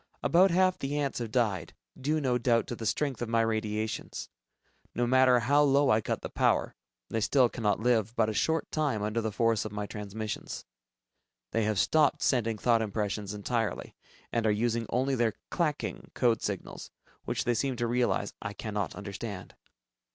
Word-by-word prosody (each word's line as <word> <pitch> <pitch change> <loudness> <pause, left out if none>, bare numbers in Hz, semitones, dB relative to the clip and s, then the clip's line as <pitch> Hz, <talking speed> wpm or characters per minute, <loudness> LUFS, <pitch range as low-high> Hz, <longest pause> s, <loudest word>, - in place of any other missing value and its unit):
About 185 +3 +5
half 185 +1 +3
the 140 +2 -2
ants 140 -3 -1
have 115 -2 -4
died, 110 -7 0 0.2
due 150 +4 0
no 125 -4 +1
doubt 115 -1 +2
to 120 - -5
the 115 -1 -4
strength 135 +2 -1
of 120 - -2
my 115 0 +3
radiations. 110 -1 -2 0.7
No 120 - +1
matter 130 0 +5
how 145 +5 +4
low 140 0 +4
I 110 +1 +4
cut - - -3
the - - -4
power, - - +1 0.4
they 115 - 0
still 125 +3 +4
cannot 110 -3 -1
live 115 -2 +1
but 110 -3 +3
a 110 - -1
short 160 +9 0
time 145 -9 0
under 105 +2 -1
the 110 -1 -2
force 115 0 +1
of 110 - -6
my 105 0 -3
transmissions. 105 +1 -5 0.9
They 115 -1 +1
have 110 -1 0
stopped 150 - +3
sending 115 -4 +1
thought 115 +1 +3
impressions 105 -1 -2
entirely, 115 +2 -2 0.4
and 115 -1 +1
are - - +4
using 115 +1 0
only 130 +3 +1
their 115 -4 +1 0.2
"clacking" 155 -4 -2
code 120 -3 +2
signals, 100 -3 -5 0.4
which - - -1
they 120 - +1
seem 130 +3 -1
to 120 0 -1
realize 120 -4 0
I 105 -2 -4
cannot 105 -3 -3
understand. 100 -1 -7
115 Hz, 180 wpm, -29 LUFS, 110-130 Hz, 0.9 s, About